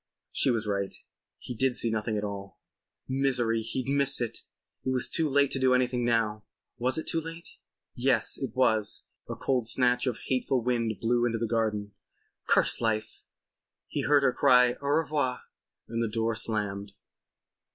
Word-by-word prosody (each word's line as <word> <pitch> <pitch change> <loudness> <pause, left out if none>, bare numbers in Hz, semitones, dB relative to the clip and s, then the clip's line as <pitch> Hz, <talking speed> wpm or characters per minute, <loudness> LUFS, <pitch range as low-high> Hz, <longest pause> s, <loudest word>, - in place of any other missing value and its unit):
She - - +2
was 115 -3 0
right. 100 -1 -2 0.4
He 125 - -7
did 130 +1 +1
see 115 - 0
nothing 110 0 -1
at 105 - -2
all. 100 -1 -6 0.5
Misery! 125 -4 +1
He'd 120 +3 -3
missed 140 0 +2
it. 120 -2 -2 0.4
It - - -2
was 130 -1 +1
too 160 -2 +1
late 140 0 +3
to 135 - 0
do 130 -1 +4
anything 125 -1 +1
now. 115 -3 +1 0.4
Was 125 +4 +1
it 160 - -3
too 165 - 0
late? 165 +1 -8 0.3
Yes, 130 +2 +1
it 130 -5 -4
was. 110 -5 +1 0.3
A - - -3
cold 125 -4 0
snatch 125 +2 +2
of 125 - -2
hateful 130 -1 0
wind 115 -2 0
blew 120 +1 +1
into 115 -1 -1
the 115 - -1
garden. 110 -2 -1 0.6
Curse - - +3
life! 110 -1 -1 0.7
He - - -2
heard 145 -1 +3
her 130 -2 +3
cry 125 -1 +5
"au 140 - -4
revoir" 145 -4 0 0.5
and 115 +1 -2
the 115 - +1
door 115 +1 0
slammed. 105 -3 -3
120 Hz, 170 wpm, -28 LUFS, 110-130 Hz, 0.7 s, cry